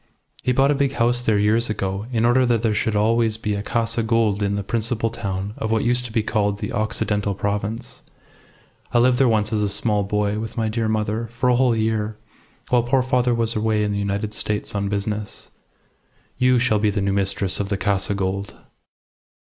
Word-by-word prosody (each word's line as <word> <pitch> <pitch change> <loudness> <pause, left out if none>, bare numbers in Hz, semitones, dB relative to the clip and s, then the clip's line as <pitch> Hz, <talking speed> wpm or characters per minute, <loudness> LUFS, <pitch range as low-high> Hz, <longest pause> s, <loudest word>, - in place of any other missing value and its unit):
He 125 - +1
bought 135 +3 +3
a 140 -1 0
big 140 -1 +1
house 120 -1 +1
there 110 -3 +2
years 110 +3 +2
ago, 100 0 -3
in 115 -1 +1
order 120 +2 +4
that 120 -2 +1
there 110 -2 +2
should 105 +1 0
always 110 +1 +2
be 105 -2 -2
a 100 - -2
Casa 115 +2 0
Gould 110 -2 +1
in 100 0 0
the 100 - -2
principal 115 +1 -1
town 100 0 -4
of 110 - -3
what 110 -1 +1
used 125 +1 +1
to 120 - -7
be 110 -1 0
called 105 -2 0
the - - -5
Occidental 105 -1 -1
Province. 105 +3 -3 0.9
I - - +2
lived 125 +1 +4
there 135 - +5
once, 110 -1 +1
as 105 - +1
a 105 - +1
small 105 +1 0
boy, 105 +1 -1
with 110 +1 -6
my 110 -1 0
dear 115 0 -1
mother, 110 +1 -1
for 120 +2 -1
a 125 - +4
whole 125 -2 +3
year, 110 -1 -1 0.5
while 125 -1 +4
poor 130 +2 +1
father 125 -2 +1
was 115 0 +1
away 110 0 +1
in 105 - 0
the 100 - -1
United 100 +1 -2
States 105 0 -2
on 100 -1 -1
business. 105 +1 -4 0.9
You 125 0 +4
shall 120 -3 +2
be 105 0 +2
the 100 0 -1
new 100 0 0
mistress 100 -1 -1
of 100 -1 -2
the 100 - 0
Casa 100 +1 +1
Gould." 100 +1 -3
110 Hz, 210 wpm, -22 LUFS, 105-115 Hz, 0.9 s, there